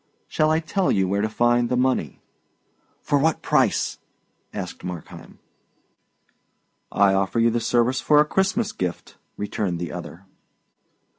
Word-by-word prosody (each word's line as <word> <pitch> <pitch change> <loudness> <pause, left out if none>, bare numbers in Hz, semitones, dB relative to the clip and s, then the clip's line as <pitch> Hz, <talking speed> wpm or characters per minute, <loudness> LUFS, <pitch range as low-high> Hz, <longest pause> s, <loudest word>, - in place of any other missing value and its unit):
Shall 155 0 +1
I 160 +1 +3
tell 180 +4 0
you 95 -2 +2
where 100 +2 0
to 110 - 0
find 120 +2 +2
the 125 - 0
money?" 125 - 0 0.8
"For 145 -1 +2
what 160 +2 +1
price?" - - +1 0.5
asked - - -7
Markheim. 90 -3 -8 1.5
"I 100 -1 +4
offer 95 +4 0
you 115 0 +4
the 120 - 0
service 120 +2 +1
for 150 -1 +4
a 150 - +5
Christmas 195 +6 0
gift," 90 -2 -5 0.2
returned 100 -3 -2
the 85 -2 -5
other. 90 +5 -8
120 Hz, 140 wpm, -23 LUFS, 95-150 Hz, 1.5 s, a